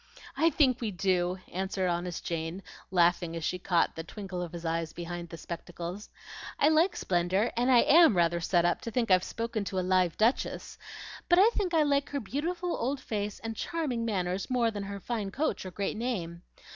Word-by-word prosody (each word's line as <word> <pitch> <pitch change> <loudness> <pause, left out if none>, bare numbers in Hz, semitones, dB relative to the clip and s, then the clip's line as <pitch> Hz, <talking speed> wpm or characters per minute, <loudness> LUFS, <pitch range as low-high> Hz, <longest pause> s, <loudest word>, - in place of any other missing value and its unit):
"I 330 - +4
think 265 -5 +2
we 225 - -1
do," 180 -1 0 0.2
answered 190 0 -1
honest 175 0 -3
Jane, 165 +3 -3 0.3
laughing 175 -2 +2
as 165 - -5
she 180 +3 -1
caught 175 -2 +1
the 165 - -5
twinkle 190 0 -6
of 175 -2 -5
his 170 -1 -7
eyes 165 0 -2
behind 175 0 -6
the 165 - -8
spectacles. 175 +3 -7 0.5
"I 295 - +4
like 320 +4 +3
splendor, 185 +5 +1
and 245 +2 +1
I 245 -2 +7
AM 320 - +6
rather 170 0 +3
set 170 +1 +2
up 175 - +1
to - - -5
think 230 -2 0
I've 185 0 +5
spoken 230 -2 -3
to 190 - -4
a 180 - -1
live 185 -2 +2
duchess; 225 +4 0 0.5
but 350 - +6
I 415 +5 +6
think 380 -7 -1
I 315 - +5
like 280 -1 +1
her 285 - -2
beautiful 335 - -2
old 265 +4 -2
face 210 -4 -3
and 225 0 -4
charming 280 -5 -2
manners 190 -4 -2
more 240 -3 +2
than 205 -2 -5
her 200 0 -5
fine 215 -1 -3
coach 275 -4 -2
or - - -4
great 195 +2 -3
name. 180 -8 -3
195 Hz, 200 wpm, -29 LUFS, 175-250 Hz, 0.5 s, I